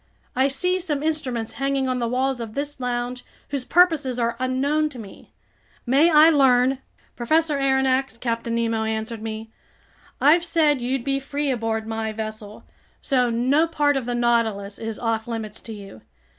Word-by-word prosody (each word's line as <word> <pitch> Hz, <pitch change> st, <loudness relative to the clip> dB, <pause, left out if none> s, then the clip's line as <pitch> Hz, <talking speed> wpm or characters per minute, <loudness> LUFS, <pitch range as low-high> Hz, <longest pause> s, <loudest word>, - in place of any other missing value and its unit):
I 260 Hz, +2 st, +3 dB
see 360 Hz, +7 st, 0 dB
some 300 Hz, -5 st, -3 dB
instruments 255 Hz, -8 st, -2 dB
hanging 275 Hz, -1 st, 0 dB
on 255 Hz, -1 st, -1 dB
the 235 Hz, -, -1 dB
walls 255 Hz, +1 st, -1 dB
of 220 Hz, -2 st, -7 dB
this 290 Hz, 0 st, -4 dB
lounge 245 Hz, 0 st, -3 dB, 0.3 s
whose 280 Hz, -3 st, -2 dB
purposes 305 Hz, -5 st, +3 dB
are 235 Hz, -1 st, 0 dB
unknown 280 Hz, +4 st, 0 dB
to 275 Hz, -, -12 dB
me. 210 Hz, -4 st, -12 dB, 0.5 s
May 275 Hz, +7 st, +4 dB
I 315 Hz, 0 st, +7 dB
learn—" 260 Hz, -2 st, +4 dB, 0.4 s
"Professor 305 Hz, +4 st, +1 dB
Aronnax," 265 Hz, -2 st, +1 dB
Captain 230 Hz, -1 st, -2 dB
Nemo 230 Hz, -1 st, 0 dB
answered 220 Hz, 0 st, -3 dB
me, 220 Hz, 0 st, -6 dB, 0.7 s
"I've 320 Hz, +5 st, +5 dB
said 300 Hz, -6 st, +2 dB
you'd 250 Hz, +1 st, -1 dB
be 275 Hz, +1 st, 0 dB
free 280 Hz, +1 st, -2 dB
aboard 225 Hz, -2 st, -2 dB
my 225 Hz, 0 st, -3 dB
vessel, 215 Hz, -1 st, -7 dB, 0.4 s
so 250 Hz, -3 st, +1 dB
no 260 Hz, +8 st, +2 dB
part 295 Hz, -3 st, +1 dB
of 260 Hz, -3 st, -2 dB
the 245 Hz, -, -1 dB
Nautilus 225 Hz, -4 st, 0 dB
is 225 Hz, -1 st, -5 dB
off 225 Hz, -1 st, -2 dB
limits 225 Hz, -2 st, -5 dB
to 230 Hz, -, -10 dB
you. 200 Hz, -, -10 dB
250 Hz, 165 wpm, -23 LUFS, 230-280 Hz, 0.7 s, I